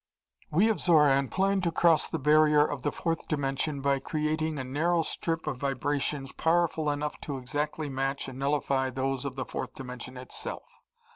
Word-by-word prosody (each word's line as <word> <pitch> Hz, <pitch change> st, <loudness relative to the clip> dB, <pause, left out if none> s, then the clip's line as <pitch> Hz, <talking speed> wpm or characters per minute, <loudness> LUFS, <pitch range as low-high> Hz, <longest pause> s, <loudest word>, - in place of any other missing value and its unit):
We 185 Hz, +8 st, +4 dB
of 220 Hz, -, +1 dB
Xoran 150 Hz, -5 st, +4 dB
plan 195 Hz, +1 st, +1 dB
to 170 Hz, -2 st, 0 dB
cross 165 Hz, -1 st, +4 dB
the 165 Hz, -, -3 dB
barrier 150 Hz, 0 st, +5 dB
of 145 Hz, -3 st, -4 dB
the 145 Hz, -, 0 dB
fourth 165 Hz, -1 st, -3 dB
dimension 140 Hz, 0 st, -1 dB
by 140 Hz, 0 st, +2 dB
creating 155 Hz, +1 st, -1 dB
a 130 Hz, -, -3 dB
narrow 165 Hz, +6 st, +1 dB
strip 165 Hz, +1 st, -2 dB
of 150 Hz, -4 st, -2 dB
vibrations 140 Hz, +1 st, -1 dB
powerful 165 Hz, -2 st, +1 dB
enough 145 Hz, +1 st, -3 dB
to 140 Hz, -2 st, -4 dB
exactly 145 Hz, +4 st, -3 dB
match 135 Hz, 0 st, -2 dB
and 130 Hz, 0 st, -8 dB
nullify 135 Hz, -1 st, +1 dB
those 135 Hz, +1 st, -2 dB
of 135 Hz, -2 st, -4 dB
the 130 Hz, -, -3 dB
fourth -, -, -5 dB
dimension 125 Hz, 0 st, -8 dB
itself. 125 Hz, 0 st, -4 dB
145 Hz, 170 wpm, -28 LUFS, 135-155 Hz, -, barrier